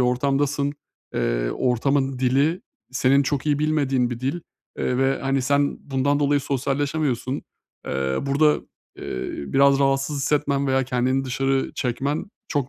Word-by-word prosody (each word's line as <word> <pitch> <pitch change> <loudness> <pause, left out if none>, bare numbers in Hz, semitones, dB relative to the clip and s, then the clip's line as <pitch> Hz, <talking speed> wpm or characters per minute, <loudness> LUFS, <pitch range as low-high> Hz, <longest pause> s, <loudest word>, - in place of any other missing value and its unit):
ortamdasın. 140 +3 +1 0.4
Eee, - - 0
ortamın 135 - 0
dili 140 +7 +2 0.3
senin 130 +2 +3
çok 140 +1 -2
iyi 145 -1 +2
bilmediğin 140 -5 +1
bir 120 - -5
dil, 135 +7 -2 0.4
eee, 125 - 0
ve 135 0 +2
hani, 135 -1 +1
sen 140 +2 +1
bundan 140 +2 +1
dolayı 145 0 +3
sosyalleşemiyorsun. 140 -1 -1 0.4
Eee, 65 0 -1
burada, 145 +2 +3 0.4
eee, 65 - -4
biraz 135 - +3
rahatsız 135 +1 +1
hissetmen 140 0 +1
veya 135 0 +2
kendini 130 +1 0
dışarı 135 +1 0
çekmen 135 +4 -2 0.2
çok 140 -3 -1
135 Hz, 130 wpm, -23 LUFS, 130-145 Hz, 0.4 s, senin